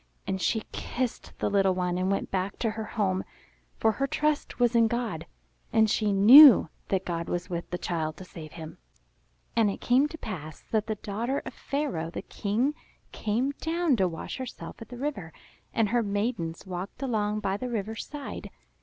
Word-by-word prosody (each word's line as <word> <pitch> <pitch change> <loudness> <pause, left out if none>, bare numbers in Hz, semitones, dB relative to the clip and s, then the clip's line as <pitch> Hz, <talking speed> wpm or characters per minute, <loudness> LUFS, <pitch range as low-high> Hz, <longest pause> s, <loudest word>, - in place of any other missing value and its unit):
And 190 -1 -2
she 220 +5 +1
kissed 250 -2 -3
the - - 0
little 195 -2 +3
one 180 -1 0
and 185 +1 0
went 195 - -1
back 190 +1 -1
to 225 - 0
her 220 0 -5
home; 195 -4 0 0.5
for 220 - +3
her 275 +6 -1
trust 300 -1 -1
was 240 -1 +3
in 230 -1 +6
God, 230 -8 -3 0.4
and 220 0 +5
she 215 0 +1
knew 225 - +9 0.2
that 190 -1 0
God 170 -1 -3
was 175 +1 -3
with 170 0 -4
the 180 - -2
child 160 -3 -2
to 185 - -9
save 155 -4 -10
him. 160 +1 -9 0.8
And 225 -3 +4
it 195 - -4
came 260 +4 +3
to 320 - -9
pass 155 - -7
that 220 -1 +1
the 220 - -1
daughter 225 +7 -3
of - - -6
Pharaoh 275 - -2
the - - -6
King 230 +8 0 0.4
came 235 +6 0
down 330 -3 +1
to 190 -2 +3
wash 165 -2 -6
herself 260 -3 -7
at 225 - -9
the 245 - -8
river; 225 - -4 0.4
and 220 -3 +1
her 240 +2 +2
maidens 205 -5 -2
walked 185 +7 -6
along 215 -4 0
by 195 -1 0
the 250 +5 -4
river's 220 -1 -3
side. 290 -2 -7
210 Hz, 190 wpm, -28 LUFS, 185-245 Hz, 0.8 s, knew